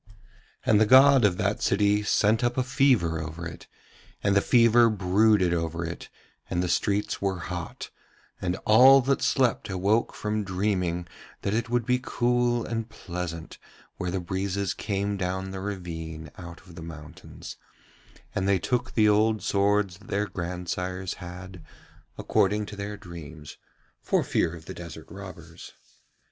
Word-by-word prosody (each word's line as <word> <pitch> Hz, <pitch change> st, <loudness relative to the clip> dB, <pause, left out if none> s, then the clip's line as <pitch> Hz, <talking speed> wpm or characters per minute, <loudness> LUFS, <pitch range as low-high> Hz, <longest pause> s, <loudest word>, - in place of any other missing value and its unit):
And 110 Hz, -1 st, +4 dB
the 110 Hz, -, +4 dB
god 135 Hz, +1 st, +7 dB
of 95 Hz, -3 st, +3 dB
that 100 Hz, 0 st, -1 dB
city 105 Hz, +1 st, +2 dB
sent 110 Hz, +2 st, +2 dB
up 120 Hz, +1 st, 0 dB
a 130 Hz, -, +2 dB
fever 125 Hz, -, +2 dB
over 80 Hz, +2 st, -6 dB
it, 85 Hz, -, -9 dB, 0.6 s
and 100 Hz, 0 st, +2 dB
the 100 Hz, -, +5 dB
fever 115 Hz, 0 st, +5 dB
brooded 100 Hz, -1 st, +3 dB
over 85 Hz, 0 st, -2 dB
it 85 Hz, +1 st, -7 dB, 0.4 s
and 90 Hz, -, 0 dB
the -, -, -1 dB
streets 100 Hz, +5 st, 0 dB
were 95 Hz, -2 st, 0 dB
hot; 85 Hz, -1 st, -6 dB, 0.5 s
and 90 Hz, 0 st, -1 dB
all 130 Hz, +5 st, +8 dB
that 135 Hz, +2 st, 0 dB
slept 125 Hz, -6 st, +1 dB
awoke 100 Hz, +5 st, +1 dB
from 105 Hz, 0 st, -2 dB
dreaming 90 Hz, -3 st, -1 dB, 0.4 s
that 100 Hz, -, -1 dB
it 115 Hz, +1 st, -1 dB
would 120 Hz, -1 st, 0 dB
be 125 Hz, +1 st, +2 dB
cool 120 Hz, -1 st, +1 dB
and 115 Hz, 0 st, -4 dB
pleasant 85 Hz, -2 st, -6 dB, 0.4 s
where 90 Hz, -, -3 dB
the 95 Hz, +2 st, -2 dB
breezes 95 Hz, +1 st, -2 dB
came 100 Hz, -1 st, -2 dB
down 95 Hz, 0 st, -3 dB
the 95 Hz, -, -5 dB
ravine 80 Hz, -5 st, -6 dB
out 85 Hz, -1 st, -10 dB
of 95 Hz, -2 st, -16 dB
the 85 Hz, -, -10 dB
mountains; 80 Hz, +1 st, -10 dB, 0.8 s
and 95 Hz, -, -1 dB
they 100 Hz, -1 st, +4 dB
took 125 Hz, +7 st, -2 dB
the 110 Hz, -2 st, +5 dB
old 105 Hz, -1 st, +3 dB
swords 100 Hz, -2 st, +1 dB
that 105 Hz, -, -17 dB
their 100 Hz, +1 st, 0 dB
grandsires 90 Hz, 0 st, -4 dB
had, 90 Hz, 0 st, -9 dB, 0.5 s
according 105 Hz, +2 st, +1 dB
to 105 Hz, -, -9 dB
their 100 Hz, +1 st, -5 dB
dreams, 80 Hz, -5 st, -10 dB, 0.4 s
for -, -, +1 dB
fear 80 Hz, -, 0 dB
of 80 Hz, -1 st, -12 dB
the -, -, -7 dB
desert 85 Hz, -2 st, -9 dB
robbers. 90 Hz, -4 st, -10 dB
95 Hz, 155 wpm, -26 LUFS, 90-110 Hz, 0.8 s, all